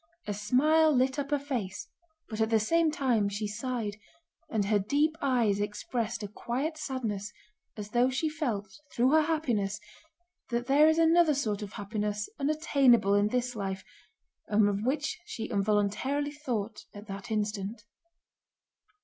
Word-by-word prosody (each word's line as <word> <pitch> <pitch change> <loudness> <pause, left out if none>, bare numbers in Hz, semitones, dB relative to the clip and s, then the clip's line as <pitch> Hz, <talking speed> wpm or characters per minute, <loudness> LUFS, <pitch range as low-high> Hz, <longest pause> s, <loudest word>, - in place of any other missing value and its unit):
A 210 - -2
smile 300 +10 +3
lit 265 +1 +2
up 280 0 -3
her 295 - +2
face 250 -9 -4 0.4
but 220 -1 -4
at 220 - +2
the 225 -1 +4
same 330 +9 +2
time 245 -9 +1
she 205 +2 -3
sighed, 215 -1 -3 0.5
and 215 -3 0
her 205 +1 +2
deep 290 +10 +1
eyes 235 -7 +2
expressed 210 +2 -3
a - - -3
quiet 255 +9 -3
sadness 230 -9 -4 0.5
as 210 0 -7
though 245 +2 +3
she 265 +5 0
felt, 250 -10 -2 0.2
through 250 +3 +2
her 315 +1 +6
happiness, 240 -11 0 0.7
that 240 0 -1
there 290 +4 +5
is 315 - +2
another 330 -1 +5
sort 215 -7 -1
of 205 -2 -7
happiness 210 0 -3
unattainable 275 - +3
in 205 0 +4
this 245 +2 -1
life 195 -2 -4 0.6
and 210 0 +4
of 205 0 -1
which 295 +7 -1
she 225 - -5
involuntarily 210 +8 0
thought 235 -8 -4
at 205 +1 -9
that 200 +3 -7
instant. 210 0 -3
235 Hz, 150 wpm, -29 LUFS, 205-280 Hz, 0.7 s, her